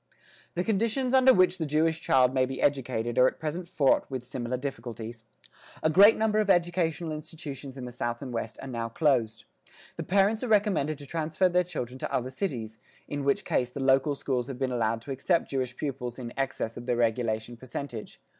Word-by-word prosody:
The 175 - 0
conditions 230 +5 0
under 260 0 +7
which 185 -4 +4
the 160 - 0
Jewish 160 +2 +1
child 130 -3 +4
may 130 -1 +2
be 135 0 -5
educated 125 -4 0
are 125 - +7
at - - -2
present 160 +3 -4
fraught 150 -6 +2
with 130 -2 -5
similar 125 -1 -3
difficulties. 120 -4 -6 0.6
A 155 - +3
great 200 +6 +7
number 215 -1 +2
of 210 -2 +1
educational 175 -2 +1
institutions 150 -3 -7
in 130 - -6
the 125 - -7
south 120 -1 -3
and 130 -3 -6
west 115 -1 -4
are - - -6
now 115 -3 -3
closed. 115 -5 +1 0.5
The - - -3
parents 200 +3 +2
are - - -1
recommended 195 -9 +2
to 145 - -11
transfer 160 +4 0
their 180 +1 +3
children 130 -8 -5
to - - -4
other 130 +1 -1
cities 120 - -4 0.3
in 145 -1 -3
which 140 0 +1
case 125 - 0
the 130 - -7
local 135 +2 +3
schools 130 -3 -2
have 135 -3 -6
been 130 -1 -1
allowed 115 -1 0
to 140 - -7
accept 165 +6 0
Jewish 130 -2 -2
pupils 125 -4 -4
in 120 -2 -7
excess 130 -4 -2
of 120 +1 -8
their 120 -1 +1
regulation 115 -1 0
percentage. 120 -1 -7
135 Hz, 200 wpm, -28 LUFS, 120-165 Hz, 0.6 s, under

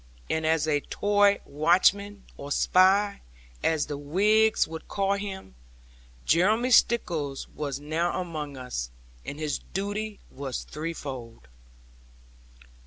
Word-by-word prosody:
And 160 0 0
as 160 -1 +2
a 150 -2 +2
Tory 205 +5 +2
watchman 190 +6 +2
or 140 +1 -8
spy, 195 +5 +3 0.4
as 160 -2 +2
the 145 -1 -5
Whigs 210 +9 +3
would 160 0 -8
call 195 0 0
him 200 - -6 0.7
Jeremy 215 +9 +3
Stickles 165 - +2
was 140 -2 -4
now 160 +5 -1
among 155 -6 -5
us; 125 - -4 0.3
and 145 - -6
his 150 -2 -2
duty 205 +2 -4
was 135 -2 -5
threefold. 135 - -7
165 Hz, 110 wpm, -27 LUFS, 145-200 Hz, 0.7 s, spy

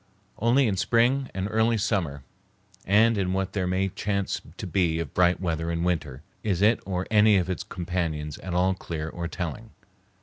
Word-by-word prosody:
Only 120 +5 +4
in 100 -4 0
spring 125 +6 +2
and 95 0 -3
early 110 +1 +2
summer 95 - -1 0.6
and 110 +2 +4
in 90 -1 0
what 95 0 -2
there 95 -3 -1
may 95 +2 0
chance 100 0 -2 0.2
to - - -5
be 85 -4 +1
of 85 - -4
bright 90 0 +3
weather 80 -2 -2
in 85 0 -1
winter 75 -6 -2 0.2
is 100 -3 0
it 110 +2 +4
or 95 -1 -2
any 105 -1 +6
of 90 0 0
its 90 - -3
companions 85 -4 -3
at 90 -2 -5
all 95 +1 +3
clear 80 -4 -5
or 85 +1 -4
telling. 95 +6 -5
95 Hz, 180 wpm, -26 LUFS, 85-105 Hz, 0.6 s, any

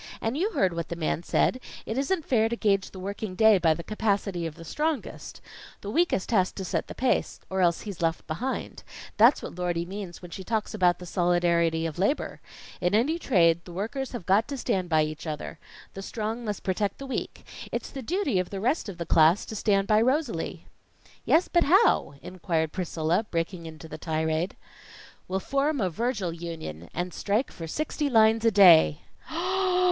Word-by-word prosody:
And 225 +3 -2
you 370 +8 +1
heard 185 -3 +2
what 170 -1 -4
the 170 - -3
man 165 -1 -1
said: 250 +8 +1 0.3
it 220 - -3
isn't 290 +6 0
fair 225 -3 +2
to 235 - -1
gage 200 -4 +1
the - - -12
working 195 +1 -5
day 220 0 +6
by 165 -2 +3
the 170 - -7
capacity 200 -5 -1
of 155 - -8
the 165 - -11
strongest. 305 - -3 0.4
The 205 - -5
weakest 330 - +1
has 185 -5 +3
to 190 - -5
set - - -2
the - - -8
pace, 260 - 0
or 190 0 0
else 170 -2 +2
he's 200 -5 -7
left 165 -1 0
behind. 240 +12 -4 0.4
That's - - +5
what - - -6
Lordy 175 -1 -1
means 190 -1 -7
when 175 -1 -11
she 190 - -7
talks 220 +1 -2
about 180 -4 +3
the 180 - -10
solidarity 170 -2 +1
of 165 +1 -4
labor. 210 +11 -1 0.4
In 180 +3 +2
any 295 +10 +2
trade, 170 - +3
the 175 - -11
workers 230 +9 -3
have 230 -8 -6
got 200 +4 +3
to 280 - -4
stand 185 -7 -1
by 155 -2 +4
each 155 +1 -5
other. 155 +1 -5 0.3
The 195 - -7
strong 220 +3 -4
must 210 -2 -4
protect 195 +1 -1
the 275 - -7
weak. 265 - -5 0.3
It's - - -4
the 270 - -6
duty 300 - 0
of 180 - -2
the 195 - -5
rest 245 - 0
of 185 - -8
the 170 - -4
class 160 +4 +4
to 220 - -7
stand 200 -2 +2
by 215 0 +4
Rosalie." 255 - -1 0.6
"Yes, 335 +3 +4
but 345 -1 +3
how?" 360 - +4
inquired 165 -4 -2
Priscilla, 175 +3 -1
breaking 170 0 -3
into 160 0 -10
the 155 0 -8
tirade. 160 +1 -1 0.7
"We'll 190 +1 -1
form 275 +6 0
a 190 -5 0
Virgil 205 -3 -2
Union, 160 - -7
and 180 0 -4
strike 215 +6 -1
for 165 - -7
sixty 295 - -2
lines 225 -2 +4
a 230 - +5
day." 175 -7 +6
190 Hz, 195 wpm, -27 LUFS, 170-225 Hz, 0.7 s, day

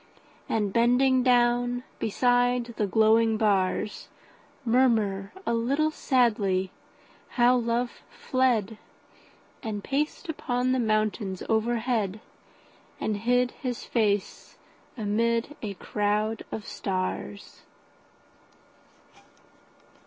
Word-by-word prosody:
And 210 -3 0
bending 250 +2 +4
down 245 0 +2 0.2
beside 245 +1 +1
the 210 - 0
glowing 220 +2 +3
bars, 205 -1 0 0.6
Murmur, 220 -5 +2
a - - 0
little 275 +7 +1
sadly, 210 -10 +1 0.7
how 245 +1 +5
love 240 0 -1
fled 230 -5 0 0.8
10 225 - -5
And 205 - -6
paced 295 +5 -2
upon 255 -5 -1
the 260 - +1
mountains 215 -4 -1
overhead, 225 -2 0 0.8
And 215 - -1
hid 245 +3 +1
his 250 -3 -5
face 205 -4 -1 0.4
amid 230 +5 0
a 205 -3 -5
crowd 210 +3 -1
of 215 - -5
stars. 190 +1 -4
230 Hz, 90 wpm, -27 LUFS, 210-245 Hz, 0.8 s, how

